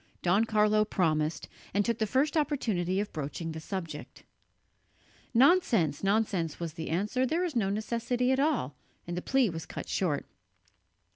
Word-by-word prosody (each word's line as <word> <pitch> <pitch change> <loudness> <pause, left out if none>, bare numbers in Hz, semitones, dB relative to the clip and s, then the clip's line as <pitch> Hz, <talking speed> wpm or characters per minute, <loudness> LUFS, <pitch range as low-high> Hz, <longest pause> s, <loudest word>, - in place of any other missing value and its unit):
Don 195 +5 +3
Carlo 215 -1 +3
promised, 160 -6 0 0.3
and 205 0 +3
took 230 0 0
the 220 - +1
first 270 +8 +1
opportunity 215 - 0
of 205 - -3
broaching 155 +2 -4
the 160 - -6
subject. 165 -3 -6 1.1
"Nonsense, 230 - +3
nonsense," 195 -6 0
was 170 -2 -4
the 160 0 -5
answer, 210 +10 0
"there 325 +7 +1
is 330 -6 -4
no 205 -5 +1
necessity 235 +4 0
at 265 - +2
all," 275 - +1 0.3
and 175 - -4
the 180 - -2
plea 265 -4 +2
was 165 -1 -6
cut - - -7
short. 155 -7 -1
205 Hz, 155 wpm, -29 LUFS, 165-245 Hz, 1.1 s, Don